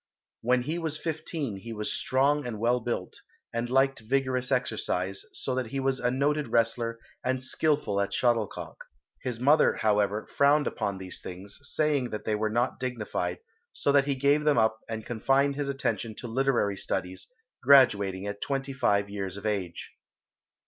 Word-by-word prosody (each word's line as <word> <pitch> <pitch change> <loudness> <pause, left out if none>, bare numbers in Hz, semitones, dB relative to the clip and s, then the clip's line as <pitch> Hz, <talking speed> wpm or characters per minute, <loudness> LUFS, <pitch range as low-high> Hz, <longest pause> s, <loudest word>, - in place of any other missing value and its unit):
When 125 +1 +2
he 160 +6 -2
was 160 -2 -2
fifteen 155 - -3
he 115 +4 -7
was 105 -1 -2
strong 140 +1 +1
and 110 -3 -5
well 120 +2 +2
built, 115 -6 -4 0.3
and 115 +1 -2
liked 135 +1 +3
vigorous 130 +2 0
exercise, 100 -6 -1
so 130 - -3
that 130 -2 -1
he 135 +4 -3
was 135 0 0
a 125 - +1
noted 145 +3 +1
wrestler 115 0 +1 0.3
and 130 0 -1
skilful 135 -8 +1
at 100 - -1
shuttlecock. 115 -4 -1 0.4
His 125 -3 -4
mother, 145 +5 +4
however, 105 0 +1
frowned 145 +1 +4
upon 100 -1 -2
these 95 -1 -5
things, 95 +3 -7
saying 145 -2 0
that 105 - -5
they 110 - 0
were 110 +1 0
not 120 +4 0
dignified, 110 -8 -3 0.3
so 140 - +1
that 140 -1 +4
he 140 -1 0
gave 140 +3 +3
them 150 -3 +3
up 110 -1 +3
and 110 -1 -4
confined 135 +4 +2
his 140 -1 -2
attention 130 -5 -2
to 120 - -7
literary 120 -5 +1
studies, 90 0 -3 0.3
graduating 105 -8 +5
at 100 0 -5
twenty 135 0 -2
five 100 -6 +2
years 100 -1 -5
of 100 - -9
age. 95 -5 -3
120 Hz, 170 wpm, -28 LUFS, 105-135 Hz, 0.4 s, graduating